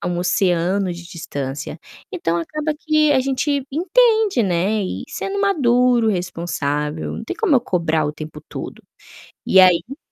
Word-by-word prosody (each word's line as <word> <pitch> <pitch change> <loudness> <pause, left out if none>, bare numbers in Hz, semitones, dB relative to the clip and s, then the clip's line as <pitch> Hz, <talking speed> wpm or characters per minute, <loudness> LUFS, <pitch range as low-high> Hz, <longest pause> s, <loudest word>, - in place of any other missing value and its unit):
a - - -5
um 175 - -2
oceano 180 +1 +1
de 175 0 -9
distância, 140 -5 -6 0.4
então 170 - -1
acaba 305 - -2
que 310 -1 +2
a 270 - +4
gente 275 +1 -1
entende, 430 - +3
né, 190 +4 +1
e 185 - -4
sendo 400 +1 -4
maduro, 250 - +3
responsável, 160 -5 -2
não 225 - -6
tem - - -4
como 410 -12 +3
eu - - +3
cobrar 160 -5 0
o 150 - -2
tempo 155 0 -9
todo. - - -7 0.7
E 190 - +5
aí 185 - +4
195 Hz, 155 wpm, -20 LUFS, -, 0.7 s, E